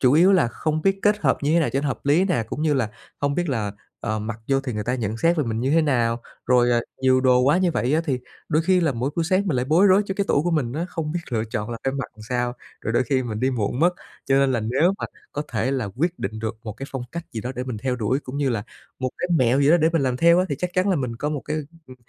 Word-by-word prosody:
chủ 125 Hz, -1 st, +4 dB
yếu 175 Hz, +6 st, +6 dB
là 175 Hz, -10 st, +4 dB
không 155 Hz, +5 st, -2 dB
biết 195 Hz, 0 st, +2 dB
kết 210 Hz, 0 st, +3 dB
hợp 140 Hz, -10 st, +2 dB
như 145 Hz, -, +1 dB
thế 170 Hz, -, +5 dB
nào 155 Hz, -, +1 dB
cho 135 Hz, -, +1 dB
nó 145 Hz, -, -1 dB
hợp 135 Hz, -, -3 dB
lý 160 Hz, +7 st, +4 dB
nè, 175 Hz, -, +1 dB
cũng 150 Hz, -, -4 dB
như 155 Hz, -2 st, +2 dB
là 115 Hz, -5 st, 0 dB, 0.3 s
hông 145 Hz, 0 st, +1 dB
biết 175 Hz, +1 st, -1 dB
là, 110 Hz, -7 st, -1 dB, 0.3 s
ờ, 110 Hz, -2 st, -2 dB
mặc 110 Hz, +1 st, -5 dB
vô 135 Hz, -1 st, +3 dB
thì 135 Hz, -2 st, -4 dB
người 105 Hz, -1 st, -3 dB
ta 125 Hz, +3 st, 0 dB
nhận 110 Hz, -3 st, -2 dB
xét 165 Hz, +8 st, +2 dB
về 150 Hz, -, +1 dB
mình 115 Hz, -1 st, -2 dB
như 130 Hz, -, 0 dB
thế 165 Hz, +2 st, +4 dB
nào. 120 Hz, -5 st, +1 dB, 0.3 s
Rồi, 125 Hz, -1 st, +4 dB
à, 120 Hz, -, +3 dB, 0.2 s
nhiều 130 Hz, 0 st, +4 dB
đồ 125 Hz, -1 st, +4 dB
quá 140 Hz, +7 st, +4 dB
như 185 Hz, -2 st, +2 dB
vậy 130 Hz, -3 st, 0 dB
á, 160 Hz, -, +3 dB
thì 135 Hz, -6 st, 0 dB, 0.3 s
đôi 155 Hz, +1 st, +2 dB
khi 185 Hz, +1 st, +3 dB
là 160 Hz, -5 st, +2 dB
mỗi 125 Hz, +4 st, -2 dB
buổi 170 Hz, -, +1 dB
sáng 185 Hz, +4 st, +1 dB
mình 155 Hz, -8 st, +1 dB
lại 125 Hz, -, 0 dB
bối 160 Hz, +9 st, +4 dB
rối 195 Hz, +1 st, +5 dB
cho 195 Hz, -, -3 dB
cái 200 Hz, 0 st, 0 dB
tủ 145 Hz, -, +3 dB
của 175 Hz, -, 0 dB
mình 145 Hz, -8 st, 0 dB
á, 160 Hz, +5 st, -2 dB
không 165 Hz, -4 st, -4 dB
biết 175 Hz, -, -2 dB
lựa 110 Hz, -2 st, 0 dB
chọn 105 Hz, 0 st, -4 dB
là 115 Hz, -, -4 dB
phải 135 Hz, -, +1 dB
mặc 140 Hz, -2 st, -4 dB
làm 110 Hz, -, -12 dB
sao, 125 Hz, -1 st, 0 dB, 0.3 s
rồi 115 Hz, -, -3 dB
đôi 120 Hz, -, +3 dB
khi 130 Hz, +2 st, +1 dB
mình 110 Hz, -3 st, -4 dB
đi 130 Hz, +1 st, +2 dB
muộn 120 Hz, +1 st, -2 dB
mất. 175 Hz, +2 st, +5 dB, 0.4 s
Cho 135 Hz, -, +3 dB
nên 135 Hz, -1 st, +3 dB
là 120 Hz, -, 0 dB
nếu 135 Hz, -, +2 dB
mà -, -, -3 dB, 0.3 s
có 145 Hz, -, -2 dB
thể 115 Hz, +3 st, 0 dB
là 130 Hz, -6 st, -1 dB
quyết 170 Hz, +5 st, 0 dB
định 110 Hz, +3 st, -4 dB
được 110 Hz, 0 st, -3 dB
một 110 Hz, -, -4 dB
cái 135 Hz, -, -8 dB
phong 135 Hz, -2 st, -4 dB
cách 170 Hz, 0 st, -5 dB
gì 115 Hz, -, -4 dB
đó 125 Hz, +4 st, -4 dB
để 125 Hz, -, -3 dB
mình 125 Hz, -3 st, -4 dB
theo 125 Hz, +3 st, -1 dB
đuổi 125 Hz, +3 st, 0 dB
cũng 130 Hz, -1 st, -7 dB
như 145 Hz, -1 st, +1 dB
là 115 Hz, -4 st, -1 dB, 0.4 s
một 130 Hz, -1 st, -2 dB
cái 180 Hz, -, -2 dB
mẹo 130 Hz, 0 st, +3 dB
gì 140 Hz, +1 st, +4 dB
đó 170 Hz, -, +7 dB
để 160 Hz, -1 st, +3 dB
mình 165 Hz, -4 st, +2 dB
làm 130 Hz, -2 st, 0 dB
theo 170 Hz, +5 st, +5 dB
á, 185 Hz, -, +3 dB
thì 145 Hz, -, -1 dB
chắc 180 Hz, +1 st, -2 dB
chắn 185 Hz, +2 st, +2 dB
là 190 Hz, -, +3 dB
mình 125 Hz, -5 st, -3 dB
có 145 Hz, +5 st, -2 dB
một 150 Hz, -2 st, -2 dB
cái, 155 Hz, +1 st, -2 dB, 0.3 s
ừ, 130 Hz, -, -12 dB
135 Hz, 320 wpm, -23 LUFS, 120-165 Hz, 0.4 s, đó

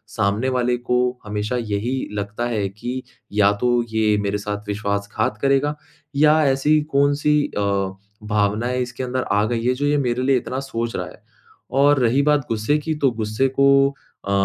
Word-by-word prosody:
सामने 110 Hz, +4 st, +1 dB
वाले 125 Hz, 0 st, +1 dB
को 125 Hz, 0 st, -1 dB, 0.3 s
हमेशा 105 Hz, +3 st, -2 dB
यही 115 Hz, +3 st, -2 dB, 0.2 s
लगता 105 Hz, +3 st, -3 dB
है 105 Hz, -4 st, -1 dB
कि 120 Hz, +6 st, -5 dB, 0.3 s
या 100 Hz, -1 st, +4 dB
तो 125 Hz, -, +2 dB, 0.2 s
ये 110 Hz, -1 st, +2 dB
मेरे 100 Hz, 0 st, -1 dB
साथ 105 Hz, 0 st, -5 dB
विश्वासघात 100 Hz, 0 st, -2 dB
करेगा 140 Hz, +2 st, +2 dB, 0.4 s
या 150 Hz, +2 st, +5 dB
ऐसी 135 Hz, +3 st, +3 dB, 0.2 s
कौन-सी 145 Hz, +1 st, +3 dB, 0.2 s
अ, -, -, +1 dB, 0.6 s
भावनाएँ 105 Hz, +4 st, 0 dB
इसके 125 Hz, +1 st, -4 dB
अंदर 130 Hz, +1 st, -2 dB
आ 105 Hz, +1 st, +3 dB
गई 115 Hz, 0 st, -2 dB
है 125 Hz, -, +3 dB
जो 145 Hz, -, 0 dB
ये 145 Hz, -, +2 dB
मेरे 125 Hz, -3 st, 0 dB
लिए 135 Hz, 0 st, +3 dB
इतना 130 Hz, +2 st, -4 dB
सोच 115 Hz, -4 st, -4 dB
रहा -, -, -2 dB
है। -, -, -14 dB, 0.6 s
और 145 Hz, 0 st, +5 dB
रही 125 Hz, +3 st, +3 dB
बात 150 Hz, -1 st, +4 dB
ग़ुस्से 110 Hz, +7 st, +1 dB
की 155 Hz, +2 st, -2 dB
तो 140 Hz, -, +4 dB
ग़ुस्से 110 Hz, +3 st, 0 dB
को 140 Hz, -, +6 dB, 0.6 s
अ 100 Hz, -, -2 dB
120 Hz, 175 wpm, -21 LUFS, 105-135 Hz, 0.6 s, को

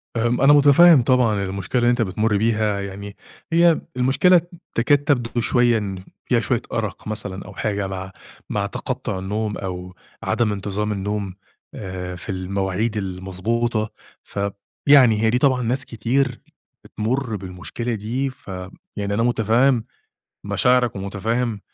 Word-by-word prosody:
آمم، 120 Hz, +2 st, +1 dB
أنا 140 Hz, +2 st, +7 dB
مُتفهّم 145 Hz, +1 st, +7 dB
طبعًا 115 Hz, -5 st, +2 dB
المشكلة 95 Hz, +5 st, -2 dB
اللي 120 Hz, 0 st, +3 dB
أنت 120 Hz, -1 st, +1 dB
بتمُر 105 Hz, +1 st, +1 dB
بيها. 110 Hz, -2 st, +1 dB
يعني 100 Hz, +1 st, -7 dB, 0.4 s
هي 170 Hz, 0 st, +4 dB, 0.2 s
المشكلة 160 Hz, +8 st, +4 dB, 0.3 s
تكاد 125 Hz, +5 st, +4 dB
تبدو 125 Hz, -5 st, 0 dB
شوية 120 Hz, -1 st, +3 dB
إن 95 Hz, -3 st, -5 dB, 0.2 s
فيها 120 Hz, -, +2 dB
شوية 115 Hz, +2 st, 0 dB
أرَق 110 Hz, -3 st, -3 dB
مثلًا 105 Hz, -3 st, -4 dB
أو -, -, -10 dB
حاجة 100 Hz, -2 st, -2 dB
مع 95 Hz, 0 st, -6 dB, 0.4 s
مع -, -, -1 dB
تَقطُّع 95 Hz, -, -4 dB
النوم 105 Hz, +2 st, -3 dB
أو 90 Hz, -1 st, -6 dB, 0.3 s
عدم 115 Hz, -3 st, +1 dB
انتظام 105 Hz, +1 st, -2 dB
النوم 100 Hz, -1 st, -3 dB, 0.4 s
آآ 90 Hz, -2 st, -6 dB
في 90 Hz, -, -10 dB
المواعيد 95 Hz, +3 st, -2 dB
المضبوطة، 105 Hz, +4 st, -2 dB, 0.3 s
ف 100 Hz, -, -7 dB, 0.5 s
يعني 125 Hz, -7 st, +6 dB
هي 110 Hz, -, +3 dB
دي 120 Hz, -, +2 dB
طبعًا 130 Hz, -1 st, +2 dB
ناس 125 Hz, +3 st, -1 dB
كتير 125 Hz, +3 st, -1 dB, 0.4 s
بتمُر 120 Hz, +1 st, -2 dB
بالمشكلة 95 Hz, +5 st, -5 dB
دي، 120 Hz, +6 st, -2 dB
ف 130 Hz, -4 st, -17 dB, 0.5 s
يعني 100 Hz, 0 st, -2 dB
أنا 115 Hz, -, +1 dB
مُتفهّم 120 Hz, +1 st, +3 dB, 0.6 s
مشاعرك 125 Hz, -2 st, +2 dB
ومُتفهّم 105 Hz, +3 st, -2 dB
110 Hz, 140 wpm, -22 LUFS, 100-125 Hz, 0.6 s, أنا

